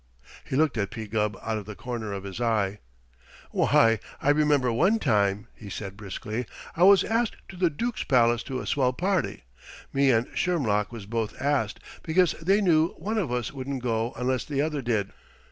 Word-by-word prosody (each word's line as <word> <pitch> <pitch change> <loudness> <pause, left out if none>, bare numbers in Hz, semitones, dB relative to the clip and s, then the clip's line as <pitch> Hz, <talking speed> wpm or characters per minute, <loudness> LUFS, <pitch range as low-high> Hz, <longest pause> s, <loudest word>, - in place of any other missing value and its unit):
He - - -4
looked 140 -5 +2
at 100 - 0
P. 110 -1 -6
Gubb 105 0 -1
out 110 -1 -1
of 105 - -11
the 105 - -7
corner 115 -3 -5
of 100 -1 -5
his 100 +4 -6
eye. 105 -4 +1 0.7
"Why, 115 -1 +4 0.2
I 145 - +3
remember 145 -5 +3
one 190 - +3
time," 105 - +1
he 105 - -11
said 100 -1 -6
briskly, 105 +3 -5 0.3
"I 170 - -4
was 195 -1 +7
asked 230 +1 0
to 190 - -9
the 180 -1 +2
Dook's 230 +10 -3
palace 120 -3 +3
to 130 -2 -3
a - - -7
swell 130 -2 +1
party. 185 - -1 0.5
Me 140 0 +3
and 115 -1 +3
Shermlock 110 - 0
was 115 -4 -8
both 110 0 -3
asked, 140 -6 0 0.2
because 175 +2 +3
they 195 +5 +3
knew 165 -4 +3
one 215 +6 -2
of 165 -12 -2
us 125 0 -2
wouldn't 135 -1 -4
go 115 0 -1
unless 125 0 -1
the 140 -2 -3
other 150 -1 0
did. 110 -5 -1
125 Hz, 190 wpm, -26 LUFS, 110-155 Hz, 0.7 s, was